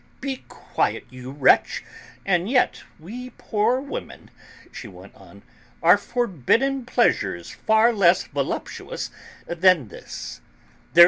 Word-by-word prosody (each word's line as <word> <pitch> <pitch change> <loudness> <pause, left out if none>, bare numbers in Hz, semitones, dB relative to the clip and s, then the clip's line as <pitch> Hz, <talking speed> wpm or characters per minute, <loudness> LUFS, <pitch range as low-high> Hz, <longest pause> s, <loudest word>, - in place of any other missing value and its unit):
"Be 265 -1 -4
quiet, - - -2
you 125 0 -9
wretch! 140 0 +3 0.4
And 185 0 +1
yet 255 0 +2 0.2
we 240 +10 -8
poor 225 +4 +1
women," 280 +1 -8 0.4
she 120 - -8
went 95 0 -13
on, 100 +1 -16 0.4
"are 175 +3 +8
forbidden 240 - 0
pleasures 95 - +1
far 220 +2 +3
less 185 -4 +4
voluptuous - - -4 0.3
than 170 - +3
this. - - -8
195 Hz, 110 wpm, -23 LUFS, -, 0.4 s, are